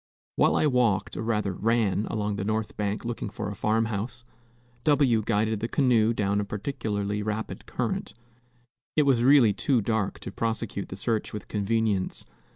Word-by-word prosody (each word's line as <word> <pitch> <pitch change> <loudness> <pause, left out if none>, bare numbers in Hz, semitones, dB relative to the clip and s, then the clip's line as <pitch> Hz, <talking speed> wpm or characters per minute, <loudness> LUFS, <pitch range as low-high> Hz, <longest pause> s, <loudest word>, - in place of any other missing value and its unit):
While - - +3
I - - +3
walked, 125 -8 +2
or - - -3
rather 105 -4 0
ran, 110 0 +1
along 105 -1 -2
the 95 - -2
north 110 +1 -2
bank 105 +2 -2
looking 120 -3 -3
for 105 0 -5
a - - -6
farm 110 +2 +1
house, 115 +3 -4 0.6
W 140 -7 +4
guided 110 0 +1
the 115 - -2
canoe 120 -4 +3
down 100 -2 0
a - - -1
particularly 105 -1 -3
rapid 110 +1 -4
current. - - -3 0.8
It 150 - +5
was 135 -4 +3
really 130 -5 +6
too 130 +4 +1
dark 110 -2 -1
to - - -6
prosecute 110 -2 -3
the - - -6
search 110 +2 -2
with 105 - -6
convenience. 105 -2 0
110 Hz, 165 wpm, -27 LUFS, 105-115 Hz, 0.8 s, really